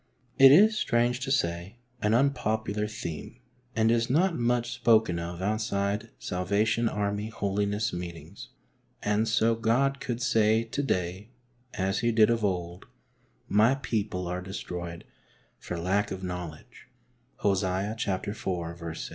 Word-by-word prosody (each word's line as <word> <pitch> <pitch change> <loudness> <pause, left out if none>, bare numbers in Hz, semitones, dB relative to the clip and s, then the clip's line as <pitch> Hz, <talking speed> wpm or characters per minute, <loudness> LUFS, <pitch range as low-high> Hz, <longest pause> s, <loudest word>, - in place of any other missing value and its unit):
It 135 0 +10
is, 210 +9 +7
strange 120 +1 +1
to 135 0 -3
say, 85 -4 -1 0.2
an 105 +1 +2
unpopular 110 -5 0
theme 85 -7 -7 0.4
and 110 0 +3
is 115 0 +1
not 170 +6 +2
much 120 0 0
spoken 110 -7 +3
of 85 +2 -5
out 110 +2 0
side 105 0 -1
Salvation 105 +6 0
Army 105 0 -2
Holiness 105 0 -1
Meetings, 85 0 -8 0.5
and 105 +2 +1
so 115 +1 +3
God 125 +5 +1
could 120 -3 -3
say 115 -3 +3
to 115 +5 -3
day, 95 -4 -2 0.5
as 95 0 0
He 120 0 +1
did 110 0 +5
of 115 -1 0
old, 90 -2 -2 0.4
" - - -39
My 120 +5 +5
people 110 -8 -2
are 90 +1 -3
destroyed 90 -2 -6 0.5
for 90 - -5
lack 95 +5 0
of 95 0 -6
knowledge 90 -4 -7 0.3
" 120 +2 -40
{Hos, 100 -2 +3
iv. 100 +5 -2
6). 85 -5 -3
105 Hz, 140 wpm, -28 LUFS, 90-115 Hz, 0.5 s, It